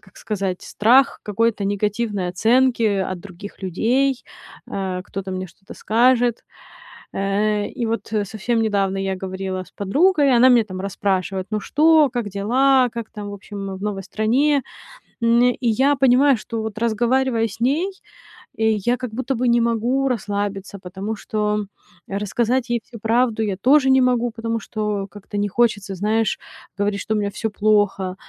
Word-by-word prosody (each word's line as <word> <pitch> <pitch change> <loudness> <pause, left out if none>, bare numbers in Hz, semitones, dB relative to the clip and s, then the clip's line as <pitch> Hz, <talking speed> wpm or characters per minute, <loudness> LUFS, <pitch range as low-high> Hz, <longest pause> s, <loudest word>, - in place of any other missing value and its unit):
как 190 -3 -22
сказать- 195 -4 -3
страх 260 +6 +3
какой-то 215 0 0
негативной 205 -1 -1
оценки 230 +2 +2 0.2
от 180 - -7
других 200 +2 -11
людей. 245 +9 +1 0.5
А, 185 -2 -3
кто-то 195 0 -6
мне 185 0 -4
что-то 195 +4 -14
скажет. 240 +1 +2 0.7
Э, 205 +1 0
и 235 - -4
вот, 225 0 -3
э, 210 -2 +1
совсем 225 +3 -1
недавно 200 -3 0
я 195 0 -2
говорила 190 0 -4
с 180 - -20
подругой, 280 - +3
она 250 +2 +6
меня 240 -3 +5
там 185 -3 -7
расспрашивает: 190 -1 -2
"Ну 215 -1 -1
что, 310 0 +4
как 240 -4 -3
дела, 250 +6 +3
как 230 -1 -6
там 205 -1 -7
в - - -6
общем 195 -1 -7
в 190 - -11
новой 205 -2 -3
стране?" 260 +9 +1 0.6
М, 235 +1 +4
и - - -6
я 265 +4 +3
понимаю, 265 0 +4
что 225 +1 -5
вот 220 -1 -5
разговаривая 235 +1 +1
с 220 +1 -11
ней, 290 +11 +1 0.7
э, 220 0 +2 0.2
я 245 +1 +2
как 250 -3 -6
будто 260 +3 -2
бы 250 +1 0
не 235 0 +4
могу 235 +4 +1
расслабиться, 200 -3 -3
потому 190 +4 -5
что 210 0 -2 0.4
рассказать 230 +5 -1
ей 240 0 +1
всю 235 - -11
правду 225 +1 +1
я 200 -3 -2
тоже 265 +6 +4
не 265 0 +5
могу, 245 -1 +2
потому 230 0 -3
что 210 -2 -3
как-то 205 +1 -8
не 205 0 +1
хочется, 205 -2 0
знаешь, 215 +2 0 0.4
говорить, 205 0 0
что 220 - -2
у - - +1
меня 205 -1 -1
всё 220 +2 -3
плохо. 205 -3 +1
215 Hz, 165 wpm, -21 LUFS, 200-245 Hz, 0.7 s, она